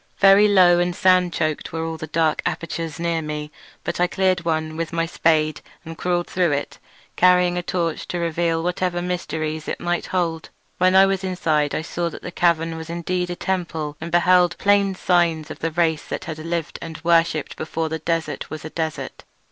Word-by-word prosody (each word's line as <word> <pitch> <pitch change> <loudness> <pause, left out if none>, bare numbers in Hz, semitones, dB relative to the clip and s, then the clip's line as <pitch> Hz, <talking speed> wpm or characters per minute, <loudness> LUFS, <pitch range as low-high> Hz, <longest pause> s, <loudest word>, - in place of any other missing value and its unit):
Very 200 +1 +7
low 180 -4 +5
and 175 0 0
sand 185 -2 +4
choked 155 -2 -2
were 160 0 -3
all 165 - -3
of 160 - -8
the 155 - -6
dark 160 0 +1
apertures 165 -1 -4
near 170 -1 0
me, 150 -1 -5 0.3
but - - -3
I 180 - +3
cleared 185 -1 +1
one 160 -1 -1
with 165 0 -3
my 165 0 0
spade 155 -2 +1 0.2
and 165 0 -7
crawled 175 +1 -1
through 175 -4 +1
it, 140 0 -4 0.4
carrying 180 0 +4
a 180 - -1
torch 170 -2 -2
to 175 - -3
reveal 165 -1 0
whatever 180 0 -1
mysteries 160 -3 -3
it - - -3
might 175 0 -2
hold. 165 -3 -2 0.3
When 185 +1 +4
I 190 0 +8
was 195 -1 -1
inside 155 -6 0
I 155 - -2
saw 170 +1 -2
that - - -10
the 180 - -6
cavern 165 -2 +1
was 160 0 -8
indeed 175 +1 -2
a 175 - -3
temple, 165 -6 -3
and 165 - -5
beheld 175 0 +4
plain 200 -1 +3
signs 170 -4 +1
of - - -8
the 165 - -1
race 160 -2 0
that - - -5
had 155 -1 -6
lived 165 0 -3
and 160 -2 -7
worshipped 165 -3 +2
before 160 +1 -3
the 160 0 -4
desert 160 -2 -2
was 155 0 -7
a 160 - -7
desert. 160 -3 -4
170 Hz, 200 wpm, -22 LUFS, 160-180 Hz, 0.4 s, I